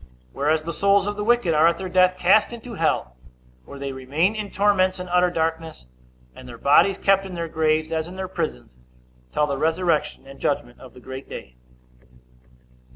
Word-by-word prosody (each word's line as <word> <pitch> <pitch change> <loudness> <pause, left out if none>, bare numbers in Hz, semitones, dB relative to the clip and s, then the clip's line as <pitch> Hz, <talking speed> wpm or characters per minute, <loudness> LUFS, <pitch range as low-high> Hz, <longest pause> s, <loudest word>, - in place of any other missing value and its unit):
Whereas 155 +2 0
the 170 +1 -5
souls 200 +4 +3
of 205 0 -3
the 210 - -3
wicked 235 -6 +2
are 155 +2 +5
at 170 0 +2
their 190 - -5
death 185 0 +3
cast 185 +6 +4
into 235 0 -9
hell, 155 - -1 0.5
where 140 - -11
they 140 0 -5
remain 140 +9 0
in 210 -2 -4
torments 195 -2 +2
and 180 0 -7
utter 180 0 +3
darkness, 160 - -3 0.5
and 130 -1 -12
their 120 - -10
bodies 165 +10 +4
kept 195 0 +2
in 190 -2 -8
their 170 -1 -3
graves, 155 0 0
as 160 0 -2
in 180 - -10
their 190 0 -4
prisons, 60 - -5 0.5
till 150 - +1
the 140 -2 -3
resurrection 160 -2 0
and 135 0 -13
judgment 120 -4 -2
of 130 - -14
the - - -12
great 130 +2 -9
day. 65 - -9
165 Hz, 190 wpm, -23 LUFS, 145-185 Hz, 0.5 s, are